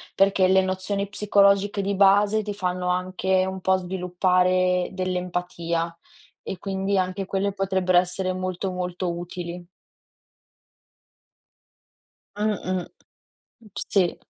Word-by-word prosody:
perché 195 -1 +4
le 190 0 +4
nozioni 190 +2 -2
psicologiche 200 0 +3
di 200 - -1
base 205 +2 +4
ti 205 -1 -5
fanno 180 -2 -2
anche 185 +1 +1
un 190 0 -5
po' 190 +1 +3
sviluppare 180 0 +1
dell'empatia, 180 -2 -2 0.5
e 190 - -6
quindi 195 +1 -1
anche 185 +1 -1
quelle 195 +1 -1
potrebbero 190 -2 +2
essere 185 +1 -1
molto, 185 +1 -3
molto 180 -1 -3
utili. 175 0 -6 2.7
Mh-mh. 185 -4 -1 0.7
M 215 - -17 0.2
sì. 185 -4 +2
185 Hz, 105 wpm, -24 LUFS, 180-195 Hz, 2.7 s, perché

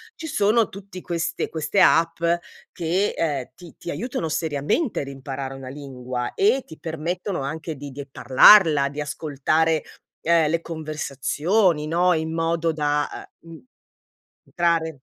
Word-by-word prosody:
ci 320 - -7
sono 225 -6 +2
tutti 195 -1 -10
queste 170 -2 -2
queste 160 +5 -1
app 165 -1 +4 0.5
che, 180 +4 0
ehm, 145 -6 -2
ti 175 -2 -14
ti - - -8
aiutano 190 - -3
seriamente 160 - -1
ad 140 - -6
imparare 135 0 -6
una 130 -1 -8
lingua 130 -3 -5
e 395 -10 +3
ti 160 - -11
permettono 170 +4 -3
anche 155 +3 -4
di 140 0 -8
die 140 +1 -7
parlarla, 145 +1 +6
di 145 +2 -8
ascoltare, 155 +1 0 0.4
uhm, 165 -1 +4
le 165 +1 +1
conversazioni, 155 - 0
no, 175 +3 +2
in 160 0 -2
modo 165 0 0
da, 150 -1 -1 0.2
uhm, 165 0 -12 0.9
m - - -25
entrare 165 -4 0
160 Hz, 140 wpm, -23 LUFS, 145-175 Hz, 0.9 s, parlarla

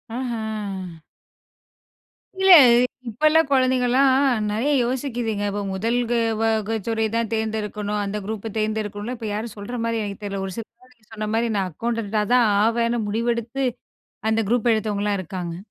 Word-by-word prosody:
ஆஹ. 215 -8 -4 1.4
இல்ல 385 0 +5 0.6
இப்ப 230 +8 -2
உள்ள 315 +1 +5
குழந்தைங்கலாம் 255 0 +3 0.4
நெறைய 235 +8 0
யோசிக்கிதுங்க, 240 -4 -2
இப்போ 205 +1 -3
முதல் 225 +5 0 0.4
வக 225 0 +1
துறை 225 -1 0
தான் 230 -1 -1
தேர்ந்தெடுக்கணும் 210 -1 -2
அந்த 200 +1 -3
குரூப்பை 220 +1 -4
தேர்ந்தெடுக்கணும்ல 215 +1 -2
இப்போ 225 -1 -5
யாரும் 215 +1 -4
சொல்ற 205 +5 -6
மாதிரி 230 -1 -1
எனக்கு 200 -1 -6
தெரியல. 200 -1 -3
ஒரு 190 - -6
சில 230 - -4
பேர் 255 0 -22
நீங்க 220 -3 -32
சொன்ன 215 -1 -4
மாதிரி 230 +1 +1
நான் 190 -2 -1
அக்கவுண்டன்ட்டா 220 +2 -2
தான் 245 -2 +5 0.2
ஆவேன்னு 235 +1 +1
முடிவெடுத்து 235 +4 -1 0.7
அந்த 220 0 +2
குரூப் 240 0 +2
எடுத்தவங்கலாம் 210 -2 -1
இருக்காங்க. 175 -1 -5
220 Hz, 140 wpm, -23 LUFS, 205-235 Hz, 1.4 s, இல்ல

